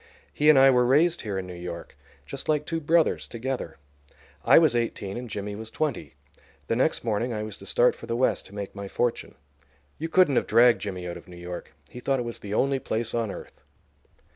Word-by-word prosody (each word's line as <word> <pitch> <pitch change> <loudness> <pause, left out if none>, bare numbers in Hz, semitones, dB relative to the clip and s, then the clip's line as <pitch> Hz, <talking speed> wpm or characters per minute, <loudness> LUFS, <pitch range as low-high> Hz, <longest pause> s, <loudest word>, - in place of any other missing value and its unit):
He 150 +1 +3
and 155 - +7
I 135 0 +7
were 125 -1 +4
raised 155 +7 +3
here 100 -3 -4
in 95 - -3
New 90 - -8
York, 85 -1 -8 0.3
just - - -7
like 150 -1 +1
two 165 +1 -2
brothers, 160 +2 +2
together. 120 - -4 0.7
I - - +7
was 155 -7 +5
eighteen 115 -4 -2
and 120 0 -6
Jimmy 105 0 -4
was 110 +1 -7
twenty. 150 0 -3 0.5
The 115 - -1
next 130 +6 +1
morning 115 +2 -1
I 105 -1 -3
was 110 -2 -7
to 100 - -11
start 120 - +3
for - - -12
the 115 - -1
West 130 - +1
to 100 - -14
make 100 -1 -5
my 100 -1 -6
fortune. 120 +4 -2 0.6
You 165 - -3
couldn't 165 -6 +4
have - - +1
dragged 120 +2 +5
Jimmy 90 -3 -5
out 85 - -5
of - - -14
New 90 -1 -12
York; 85 -4 -8 0.2
he 125 - -8
thought 135 +2 0
it 125 - -3
was 115 - -6
the 105 0 -5
only 135 +2 +2
place 115 -2 -2
on 115 -2 -1
earth. - - -10
115 Hz, 220 wpm, -26 LUFS, 100-135 Hz, 0.7 s, and